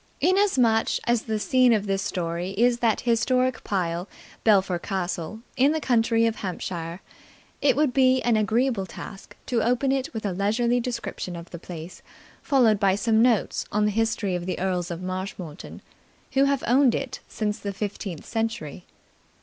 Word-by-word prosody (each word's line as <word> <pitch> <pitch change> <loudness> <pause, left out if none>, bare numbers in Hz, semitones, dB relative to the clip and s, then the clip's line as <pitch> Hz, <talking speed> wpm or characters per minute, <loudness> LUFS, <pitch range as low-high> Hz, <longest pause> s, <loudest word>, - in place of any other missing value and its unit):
Inasmuch 270 - +3
as 240 -1 +2
the 220 -2 -2
scene 245 +4 +4
of 210 -2 +1
this 195 -1 0
story 175 -1 -3
is 240 +1 +3
that 230 -3 +1
historic 250 +1 +1
pile, 180 -2 -2 0.3
Belpher 195 -5 +3
Castle, 185 +2 -4
in 275 +4 +4
the 315 - 0
county 230 -4 +2
of 225 -1 0
Hampshire, 175 -2 -5 0.6
it 285 - +4
would 290 -2 +2
be 260 0 +4
an 240 -1 +3
agreeable 220 -1 +1
task 195 +1 -10
to 235 -3 0
open 250 +4 +1
it 270 -1 -1
with 220 -3 -5
a 200 - 0
leisurely 230 +6 +1
description 235 -7 -4
of 170 0 -9
the 170 - -7
place, 170 0 -9 0.4
followed 240 -8 +3
by 195 -2 +3
some 220 +2 +2
notes 235 -3 +2
on 210 0 +2
the 210 - +2
history 225 -2 0
of 175 0 -3
the 185 - -2
Earls 180 -1 -1
of 170 +1 -5
Marshmoreton, 185 -4 -6 0.5
who 270 +1 +4
have 275 -1 +1
owned 255 0 +4
it 265 -2 -4
since 210 -1 -3
the 200 - -4
fifteenth 195 -4 -5
century. 225 -8 -3
220 Hz, 165 wpm, -25 LUFS, 190-245 Hz, 0.6 s, scene